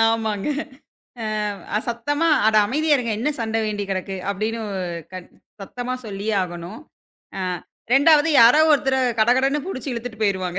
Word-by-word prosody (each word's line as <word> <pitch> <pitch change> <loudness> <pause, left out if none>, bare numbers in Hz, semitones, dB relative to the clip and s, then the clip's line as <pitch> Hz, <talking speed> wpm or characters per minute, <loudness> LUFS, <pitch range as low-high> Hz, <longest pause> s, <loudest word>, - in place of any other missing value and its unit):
ஆமாங்க. 220 -2 -1 1.3
அ - - +3
சத்தமா, 290 +8 0 0.2
"அட 220 0 +3
அமைதியா 300 +6 +2
இருங்க, 235 -3 -2
என்ன 265 +7 0
சண்டை 225 0 -1
வேண்டிக்கிடக்கு?" 195 -2 -3
அப்படின்னு 220 +3 -3 0.5
கத் 185 -1 -9 0.3
சத்தமா 245 +5 -5
சொல்லியே 205 +1 -3
ஆகணும். 175 - -7 0.6
அ - - -3 0.5
2வது 300 +3 +5
யாரோ 240 +6 +7
ஒருத்தரை 270 -2 +2 0.2
கடகடன்னு 260 +6 +3
புடிச்சு 295 -8 -5
இழுத்துட்டு 235 -1 -6
போயிருவாங்க. 185 -3 0
225 Hz, 125 wpm, -22 LUFS, 200-270 Hz, 1.3 s, யாரோ